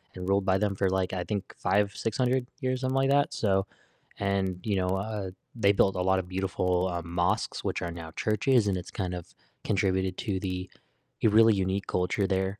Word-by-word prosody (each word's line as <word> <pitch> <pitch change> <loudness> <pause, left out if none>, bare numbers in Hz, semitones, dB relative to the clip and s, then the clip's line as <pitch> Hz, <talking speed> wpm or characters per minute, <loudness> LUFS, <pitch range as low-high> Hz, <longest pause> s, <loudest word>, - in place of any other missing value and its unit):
and 90 0 -6
ruled 100 0 +2
by 95 0 +3
them 100 0 0
for, 95 -1 +1
like, 95 -1 0
I 90 -1 -1
think, 100 -1 -4
5 100 0 +1
600 125 +3 0
years, 130 -1 -1
something 130 +1 0
like 135 0 +3
that, 145 +1 +3
so 95 -2 +1 0.5
and, 95 -2 0
you 105 -3 0
know, 90 -1 +1
uh, 100 0 -2 0.3
they 100 -4 +4
built 100 -1 +3
a 90 - 0
lot 95 +1 +3
of 90 - -5
beautiful, 90 -1 0
uh, 85 -1 -2
mosques, 85 +1 -1
which - - -2
are 85 - -2
now 85 -1 -8
churches, 110 - +2
and 100 - +1
it's 90 - -7
kind 90 -3 -3
of 85 - -9 0.3
contributed 95 -1 0
to 95 -3 -2
the 90 -1 -3 0.5
a - - +6
really 110 +1 +6
unique 95 0 -1
culture 90 +2 0
there. 95 +1 -1
95 Hz, 205 wpm, -28 LUFS, 95-105 Hz, 0.5 s, a